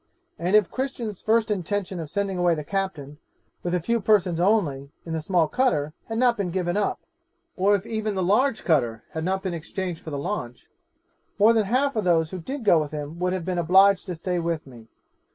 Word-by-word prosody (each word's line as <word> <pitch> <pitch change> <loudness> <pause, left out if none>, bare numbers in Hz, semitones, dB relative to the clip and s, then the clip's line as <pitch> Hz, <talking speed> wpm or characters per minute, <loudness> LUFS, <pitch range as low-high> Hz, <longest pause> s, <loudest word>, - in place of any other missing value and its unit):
And 180 +4 +1
if 210 -5 +4
Christian's 245 -6 -4
first 220 0 +2
intention 195 -1 -2
of 160 -3 -6
sending 200 -1 -2
away 175 -1 +3
the 150 - -5
captain, 150 -5 -4 0.4
with 175 0 -1
a - - +1
few 235 +7 0
persons 185 -5 +2
only, 170 -9 +1 0.2
in 165 - -5
the 160 - -2
small 170 0 +2
cutter, 155 - 0
had 225 - -3
not 245 -1 +3
been 200 -3 -1
given 175 0 -1
up, 205 -1 0 0.6
or 200 +2 +3
if 200 0 -3
even 220 -2 -2
the 190 - 0
large 220 +8 +2
cutter 120 -9 +1
had 160 - -4
not 190 +2 -1
been 185 -3 -2
exchanged 170 +1 -5
for - - -8
the 145 - -4
launch, 125 -3 -5 0.7
more 215 +3 +6
than 220 -2 +2
half 260 +6 +1
of 215 - 0
those 165 -3 +2
who 185 - -5
did 260 - -6
go 175 -5 +6
with 150 -1 -2
him 150 +2 -6
would 180 0 0
have 185 -3 -3
been 180 -1 -1
obliged 190 +3 +4
to 180 - -3
stay 180 +2 -2
with 165 -1 -2
me. 120 -4 -14
185 Hz, 215 wpm, -25 LUFS, 160-210 Hz, 0.7 s, more